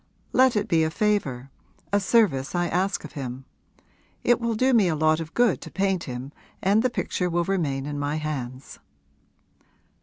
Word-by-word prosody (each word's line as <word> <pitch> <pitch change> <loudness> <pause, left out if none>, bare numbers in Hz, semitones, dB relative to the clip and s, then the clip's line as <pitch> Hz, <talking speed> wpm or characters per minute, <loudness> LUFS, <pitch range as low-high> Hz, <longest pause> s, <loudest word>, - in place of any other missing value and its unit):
Let 260 -2 +5
it 210 - 0
be 165 -2 +3
a 160 - +1
favour, 160 - -1 0.4
a 205 - +5
service 185 - +2
I 175 0 +1
ask 190 +3 0
of 150 - -9
him. 130 -2 -6 0.8
It 240 - +3
will 230 -1 0
do 255 +4 +2
me 215 -6 +5
a 165 - +1
lot 155 +1 +2
of 160 -1 -7
good 240 -5 +3
to - - -8
paint 195 -2 0
him 125 +2 -6 0.3
and 200 +3 +3
the 255 - +2
picture 180 -6 -2
will 170 0 +1
remain 155 -8 -1
in 145 0 -4
my 145 +1 -1
hands.' 135 -4 -5
170 Hz, 180 wpm, -25 LUFS, 145-205 Hz, 0.8 s, Let